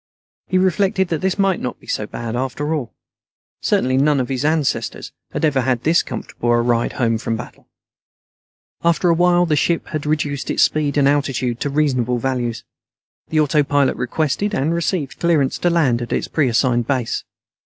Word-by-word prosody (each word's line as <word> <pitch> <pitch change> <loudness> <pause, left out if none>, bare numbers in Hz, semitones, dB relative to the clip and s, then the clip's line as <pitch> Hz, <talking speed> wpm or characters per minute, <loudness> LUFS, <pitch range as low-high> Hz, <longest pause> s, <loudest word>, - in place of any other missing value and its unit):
He 185 - +1
reflected 190 0 +1
that 160 - -1
this 190 0 0
might 195 -2 +2
not 125 - -5
be - - -19
so 105 - -2
bad 115 +1 -5
after 135 +5 -2
all. 140 -7 -3 0.7
Certainly 130 +1 +1
none 145 +1 +3
of 125 - -2
his 130 0 -2
ancestors 155 -2 -1 0.2
had - - 0
ever 140 -3 +2
had 125 -1 0
this 165 +2 +4
comfortable 120 - -5
a 120 - +3
ride 120 0 +1
home 115 -4 0
from 115 - -2
battle. - - -10 1.2
After 170 +1 +2
a - - +5
while, 175 +1 +3
the 155 -3 +1
ship 165 +3 0
had 150 -2 -4
reduced 145 -2 -1
its - - +3
speed 150 -2 +1
and 140 -1 +4
altitude 135 -4 0
to 145 - -1
reasonable 130 -4 +1
values. 120 -2 -2 0.7
The 155 -1 +2
autopilot 145 -1 +2
requested, 155 - -1
and 155 +2 0
received, 170 -4 -2
clearance 160 -6 +1
to 175 - +2
land 140 -9 +2
at 120 - -5
its - - -1
preassigned 120 -4 +1
base. 130 -4 -1
145 Hz, 175 wpm, -20 LUFS, 125-165 Hz, 1.2 s, a